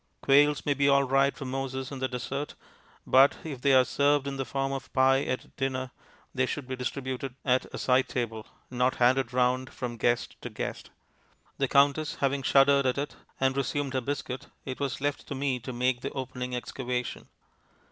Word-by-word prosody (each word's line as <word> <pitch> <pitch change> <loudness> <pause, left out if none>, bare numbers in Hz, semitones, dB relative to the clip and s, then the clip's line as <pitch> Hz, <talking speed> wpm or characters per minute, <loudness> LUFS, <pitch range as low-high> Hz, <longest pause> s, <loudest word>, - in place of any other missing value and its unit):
Quails 145 +1 +4
may 145 - +3
be 140 +1 +2
all 140 0 +5
right 135 +1 +2
for 135 - -6
Moses 135 0 -4
in 135 - -6
the 130 - 0
desert, 130 +3 -4 0.5
but, 135 +2 +5
if 140 -6 -6
they 140 - +3
are 130 -1 +6
served 145 +1 +2
in 140 -1 -4
the 135 - -2
form 135 +2 -2
of 135 -1 -5
pie 135 0 +4
at 130 - -4
dinner, 130 -1 -2 0.4
they 130 -1 +1
should 140 -1 -4
be 130 - -3
distributed 130 0 -4
at 130 -1 +2
a - - -6
side 130 0 +2
table, 115 -4 -3 0.2
not 125 +1 +1
handed 125 0 +3
round 125 +1 +1
from 120 -2 -5
guest 120 +2 0
to - - -5
guest. - - -5 0.7
The 135 - +2
Countess 145 +3 +3
having 140 0 0
shuddered 140 +1 +4
at 125 - 0
it 145 +1 -3 0.2
and 135 0 +2
resumed 140 0 -1
her 130 - 0
biscuit, 130 -1 -4 0.2
it 130 -1 -5
was 140 -2 -2
left 145 0 -2
to 140 - -4
me 135 -2 -1
to 130 +2 -7
make 125 0 0
the 140 - -3
opening 125 -1 -4
excavation. 125 0 -4
130 Hz, 190 wpm, -28 LUFS, 125-140 Hz, 0.7 s, are